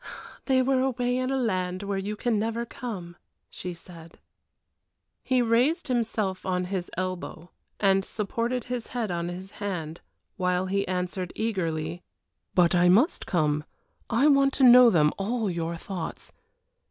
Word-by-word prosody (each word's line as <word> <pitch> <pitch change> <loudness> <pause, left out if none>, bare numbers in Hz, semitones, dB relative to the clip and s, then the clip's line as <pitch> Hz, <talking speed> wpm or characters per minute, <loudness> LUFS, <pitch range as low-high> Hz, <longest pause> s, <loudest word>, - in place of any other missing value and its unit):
"They 260 -1 +3
were 260 0 +2
away 250 -1 0
in 255 0 -1
a 270 - 0
land 185 -6 -1
where 200 0 -2
you 205 +2 -3
can 220 0 0
never 230 +2 -2
come," 190 -9 -7 0.3
she 180 - -6
said. 170 -1 -13 1.0
He 255 -2 +2
raised 245 +7 +2
himself 220 -6 -1
on 180 -1 -1
his 180 -2 -2
elbow, 180 -2 -5 0.3
and 195 -1 +3
supported 230 +5 -2
his 245 -1 -4
head 220 -5 -1
on 170 0 -2
his 185 +2 -7
hand, 175 -5 -4 0.4
while 180 0 +1
he 200 +1 -1
answered, 180 0 -3
eagerly: 170 -6 -2 0.5
"But 175 -1 +4
I 175 0 +4
must 240 - +3
come! 150 -3 +1 0.5
I 235 +4 +3
want 275 -2 +4
to 270 - +1
know 250 -1 +9
them, 155 -7 +3
all 215 0 -1
your 170 0 -3
thoughts. 170 0 -6
195 Hz, 150 wpm, -27 LUFS, 180-240 Hz, 1.0 s, know